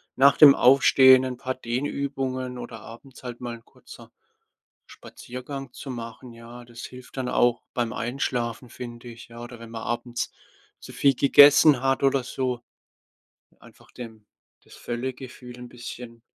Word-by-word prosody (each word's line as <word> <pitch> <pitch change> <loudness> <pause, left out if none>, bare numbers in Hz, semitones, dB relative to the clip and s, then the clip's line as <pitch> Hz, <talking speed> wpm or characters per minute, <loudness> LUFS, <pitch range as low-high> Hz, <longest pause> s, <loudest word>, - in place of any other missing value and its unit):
nach 140 +2 +5
dem 145 -2 +9
Aufstehen 130 0 +6
ein 125 -1 -5
paar 130 0 -4
Dehnübungen 130 0 -4
oder 115 -2 -8
abends 125 +3 -14
halt 120 -1 -7
mal 120 -1 -5
'n 115 - -16
kurzer - - -16 0.8
Spaziergang 130 +1 -9
zu 135 - -9
machen. 115 0 -8
Ja, 115 +1 -12
das 120 0 -12
hilft 125 +1 -11
dann 130 -1 -3
auch 120 -1 +1
beim 120 -2 -2
Einschlafen, 120 -1 -3
finde 120 -1 -10
ich. 115 -1 -12
Ja, 115 0 -12
oder 120 0 -10
wenn 115 0 -12
man 115 -1 -7
abends 120 0 -4 0.5
zu - - -11
viel 140 -1 +2
gegessen 145 +1 +6
hat 135 0 0
oder 135 -1 +2
so, 125 -1 -3 1.0
einfach - - -19
dem 110 -4 -11 0.4
das - - -17
Völlegefühl 125 0 -7
'n 125 0 -10
bisschen, 120 -1 -10
125 Hz, 150 wpm, -24 LUFS, 120-130 Hz, 1.0 s, dem